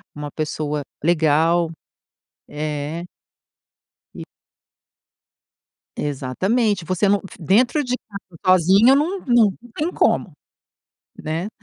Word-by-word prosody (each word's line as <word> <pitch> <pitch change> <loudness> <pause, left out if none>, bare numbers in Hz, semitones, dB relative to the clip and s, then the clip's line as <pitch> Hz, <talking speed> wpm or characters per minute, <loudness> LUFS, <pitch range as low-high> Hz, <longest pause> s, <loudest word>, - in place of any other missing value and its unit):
uma 150 -1 -6
pessoa 150 -1 -3 0.2
legal. 165 +1 +2 0.8
É. 150 +2 -4 1.1
E - - -7 1.7
Exatamente, 185 - -1
você 185 +3 0
não 200 +1 +3
f 195 - -13
dentro 240 - +2
de 250 -2 -3 0.2
casa 190 -5 -11 0.2
sozinha 200 +10 +5
não 335 +7 0
não 230 -5 +4 0.2
tem 315 +4 -1
como, - - +1 0.9
né, 160 +5 -3
175 Hz, 95 wpm, -21 LUFS, 155-220 Hz, 1.7 s, sozinha